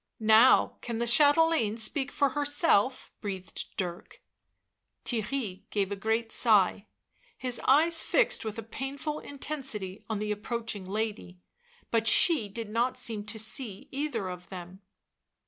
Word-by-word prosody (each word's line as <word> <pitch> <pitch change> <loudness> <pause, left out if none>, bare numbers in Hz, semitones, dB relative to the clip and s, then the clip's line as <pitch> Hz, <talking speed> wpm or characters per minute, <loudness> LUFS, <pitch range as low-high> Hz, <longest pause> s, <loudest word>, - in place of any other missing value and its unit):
" - - -55
Now 220 +3 +5
can 235 -2 -4
the 235 - -1
chatelaine 290 -3 +4
speak 270 +4 +1
for 280 - +2
herself," 290 - +1
breathed 190 -3 -5
Dirk. 175 -2 -5 0.9
Theirry 220 -4 -4
gave 200 -2 -1
a - - -1
great 225 +3 -1
sigh, 210 -2 +3 0.5
his 250 -2 0
eyes 320 +5 +5
fixed - - +1
with 220 -1 -5
a 225 - -5
painful 280 +6 -5
intensity 265 -9 -5
on 220 - -1
the 210 +1 -3
approaching 210 -1 -4
lady, 210 -2 -4 0.5
but 225 -1 +1
she 245 - +5
did 220 +1 -7
not 240 +3 0
seem 215 -3 -2
to 215 +1 -3
see 220 +3 -3
either 270 -8 -3
of 180 -1 -8
them. 185 +1 -9
225 Hz, 140 wpm, -28 LUFS, 205-270 Hz, 0.9 s, Now